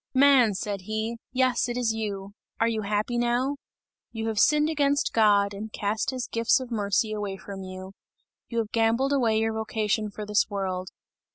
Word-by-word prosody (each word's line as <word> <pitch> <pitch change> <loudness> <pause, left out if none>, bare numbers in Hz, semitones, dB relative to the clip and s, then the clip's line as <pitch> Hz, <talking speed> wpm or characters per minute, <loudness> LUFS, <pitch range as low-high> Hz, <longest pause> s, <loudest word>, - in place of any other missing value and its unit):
"Man," 260 -6 +5
said 200 0 -3
he, 220 +2 -3
"yes, 255 -1 +1
it 240 - -3
is 235 -3 +1
you! 200 -3 -4 0.3
Are 230 - +3
you 225 -1 -1
happy 210 +4 -1
now? 245 +4 0 0.5
You 225 -1 -3
have 215 -2 -1
sinned 300 +3 +4
against 285 -2 +1
God, 205 -2 +4
and 210 +2 -7
cast 210 +2 -1
his 255 -2 -3
gifts 230 +3 +2
of 255 -2 -8
mercy 210 0 0
away 205 -2 -4
from 195 0 -8
you; 185 0 -8 0.6
you 235 - -4
have 225 -2 -1
gambled 230 +5 +2
away 235 -5 +2
your 225 0 +1
vocation 220 -1 -1
for 210 +1 -7
this 210 +1 +1
world. 190 -2 -3
220 Hz, 180 wpm, -26 LUFS, 205-240 Hz, 0.6 s, Man